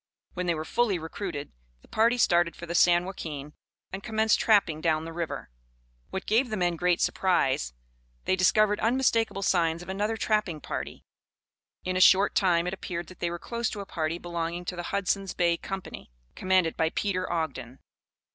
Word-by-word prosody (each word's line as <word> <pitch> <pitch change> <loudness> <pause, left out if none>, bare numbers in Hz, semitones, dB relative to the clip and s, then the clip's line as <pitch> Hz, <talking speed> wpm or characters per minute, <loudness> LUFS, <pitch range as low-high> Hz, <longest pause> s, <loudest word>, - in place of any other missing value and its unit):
When 180 0 -3
they 170 - +2
were 155 0 -4
fully 225 -1 +1
recruited, 160 -2 -5 0.3
the - - -19
party 230 +3 +2
started 175 -6 +3
for 170 - -8
the 170 - -5
San 175 0 +4
Joaquin, 150 -6 -6 0.4
and 195 - -4
commenced 220 0 +2
trapping 195 -8 +3
down 160 -1 +1
the 165 - -7
river. 165 - -5 0.6
What 190 - -5
gave 240 +4 +2
the 215 - -2
men 175 -2 +1
great 180 +1 +1
surprise, 130 - +1 0.5
they - - +2
discovered 210 +3 +3
unmistakable 225 -4 +1
signs 170 -2 +1
of 175 - -12
another 210 +4 -1
trapping 210 -8 0
party. - - -6 0.8
In 185 0 -2
a 185 - +2
short 195 +2 +6
time 175 -3 +3
it 180 - -2
appeared 175 -3 -5
that 185 - -14
they 175 - -1
were 175 - -4
close 235 +4 -3
to 210 - -6
a 200 - -5
party 160 -2 -2
belonging 170 0 -4
to 180 - -4
the 175 - -4
Hudson's 195 -1 -1
Bay 170 -1 +2
Company, 190 - -7 0.2
commanded 185 -3 +1
by 160 - +1
Peter 185 0 -2
Ogden. 135 -7 -3
180 Hz, 180 wpm, -27 LUFS, 170-200 Hz, 0.8 s, short